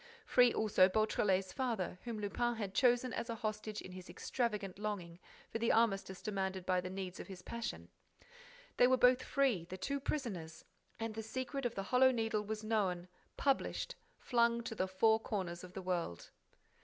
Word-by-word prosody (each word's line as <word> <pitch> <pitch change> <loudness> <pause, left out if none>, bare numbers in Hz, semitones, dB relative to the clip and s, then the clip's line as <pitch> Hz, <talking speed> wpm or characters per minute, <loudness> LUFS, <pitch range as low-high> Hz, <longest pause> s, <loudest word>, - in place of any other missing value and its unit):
Free 245 -1 +5
also 195 -4 +4
Beautrelet's 195 -2 +1
father, 230 -9 -2
whom 235 -2 -3
Lupin 240 +4 0
had 205 -4 -4
chosen 245 0 +3
as 235 - -3
a 230 - -2
hostage 215 -1 -3
in 185 - -9
his 185 0 -9
extravagant 210 -6 -2
longing 185 -5 -4 0.3
for 225 - -2
the 230 - +3
armistice 195 -4 +1
demanded 190 -3 -2
by 185 -1 +2
the 180 - -5
needs 185 -1 -5
of - - -7
his 185 -2 -9
passion! 235 0 -5 0.9
They 245 - +7
were 260 0 +4
both 250 0 +5
free, 260 - +1
the 185 +2 -7
two 280 +9 -2
prisoners! 195 - -4 0.3
And 225 -1 -3
the 220 - -4
secret 260 +3 -2
of 235 - -9
the 195 - -2
Hollow 255 +5 +5
Needle 225 -3 0
was 215 +1 -4
known, 190 -5 0 0.3
published, 275 -1 0 0.2
flung 235 -1 +2
to 230 - -4
the 190 -3 -1
four 220 +4 +4
corners 185 -6 -3
of 180 0 -10
the 190 - -6
world! 175 - -3
215 Hz, 180 wpm, -36 LUFS, 185-235 Hz, 0.9 s, They